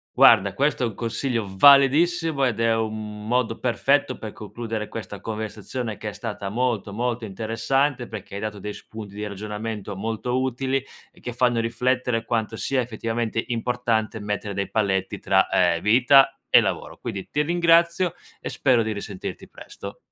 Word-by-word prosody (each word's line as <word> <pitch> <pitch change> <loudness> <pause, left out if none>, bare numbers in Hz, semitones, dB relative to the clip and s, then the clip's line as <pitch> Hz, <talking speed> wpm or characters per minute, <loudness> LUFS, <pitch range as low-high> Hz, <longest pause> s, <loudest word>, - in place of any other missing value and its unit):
Guarda - - +6
questo 140 -2 +1
è - - +2
un 105 - -7
consiglio 115 -1 -2
validissimo 140 - +5
ed 115 -3 -1
è 115 0 +3
un 110 -1 -4
modo 120 -1 0
perfetto 130 +4 +1
per 110 - -7
concludere 110 0 -5
questa 105 -3 -7
conversazione 110 +1 -5
che 105 - -5
è - - -6
stata 105 -4 -5
molto, 115 -3 -1
molto 120 +2 -2
interessante 120 +6 -1
perché 105 -3 -9
hai 100 - -4
dato 105 -1 -4
dei 105 +1 -5
spunti 105 -3 -10
di 105 +1 -4
ragionamento 105 0 -5
molto 115 +5 -2
utili 130 +1 -1 0.3
e - - -22
che 120 - -6
fanno 120 -1 +2
riflettere 120 0 0
quanto 110 -1 -1
sia 130 +3 0
effettivamente 115 -1 -2
importante 115 -2 -1
mettere 105 -1 -3
dei 100 0 -3
paletti 95 -3 0
tra, - - +3
ehm, 85 0 +2
vita 125 +5 +5
e - - +7
lavoro. - - -3
Quindi 95 -1 -6
ti 150 - +1
ringrazio 170 +1 +3 0.3
e - - -4
spero 130 -4 +2
di 110 -1 -1
risentirti 100 -2 -6
presto. - - -10
115 Hz, 160 wpm, -24 LUFS, 105-125 Hz, 0.3 s, e